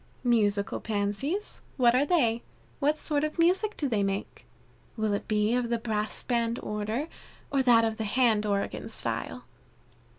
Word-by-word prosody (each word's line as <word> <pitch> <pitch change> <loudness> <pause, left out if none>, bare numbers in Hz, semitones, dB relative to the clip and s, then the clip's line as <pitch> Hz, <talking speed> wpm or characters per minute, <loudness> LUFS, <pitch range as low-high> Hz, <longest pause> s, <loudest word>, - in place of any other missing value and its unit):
"Musical 210 -5 +1
Pansies! 220 - -2 0.2
what 240 -3 +5
are 270 +3 +3
they? 240 -10 +2 0.4
What 300 +1 +2
sort 295 -1 0
of 305 +2 -2
music 370 +6 +2
do 290 - 0
they 220 -5 0
make? 195 0 -3 0.5
Will 215 -1 0
it 200 - -3
be 210 +1 +2
of 245 -1 0
the 235 - +1
Brass 215 -2 -2
Band 235 -1 0
order, 215 +7 -2 0.4
or 275 - +3
that 235 -3 +5
of 220 -1 -2
the 220 - -2
hand 225 -1 +3
organ 200 -1 -2
style?" - - -4
230 Hz, 160 wpm, -28 LUFS, 210-275 Hz, 0.5 s, what